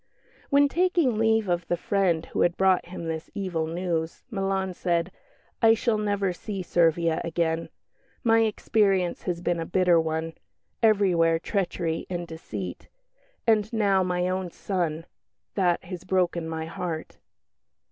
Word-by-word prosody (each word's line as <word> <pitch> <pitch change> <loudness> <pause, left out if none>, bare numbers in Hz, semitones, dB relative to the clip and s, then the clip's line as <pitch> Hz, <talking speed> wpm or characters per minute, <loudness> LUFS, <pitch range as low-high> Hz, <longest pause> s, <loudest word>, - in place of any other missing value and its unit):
When 285 0 +5
taking 335 -8 +2
leave 220 -1 +3
of 175 -1 -1
the 175 - 0
friend 180 -3 +1
who - - -3
had 175 0 +2
brought 190 -2 +3
him 175 -1 -7
this 160 0 -4
evil 180 -6 -2
news 165 -1 -3
Milan 195 -2 -1
said, 175 0 0 0.5
"I 225 0 +6
shall 225 -1 0
never 200 -3 0
see 195 +1 -5
Servia 165 -1 +2
again. 165 -1 -1 0.5
My 225 -2 +4
experience 205 -4 +1
has 175 -2 -2
been 175 -1 0
a 165 - -2
bitter 180 -2 +4
one 160 0 -2 0.5
everywhere 185 -7 +4
treachery 170 -3 -2
and 175 -1 -3
deceit. 105 - -7 0.6
And 215 -2 +3
now 200 -4 +2
my 180 -1 0
own 185 0 -2
son 170 -3 -2 0.5
that 180 -3 +1
has 180 -1 -7
broken 175 -3 0
my 160 0 -3
heart." 165 -1 -5
180 Hz, 140 wpm, -26 LUFS, 165-200 Hz, 0.6 s, I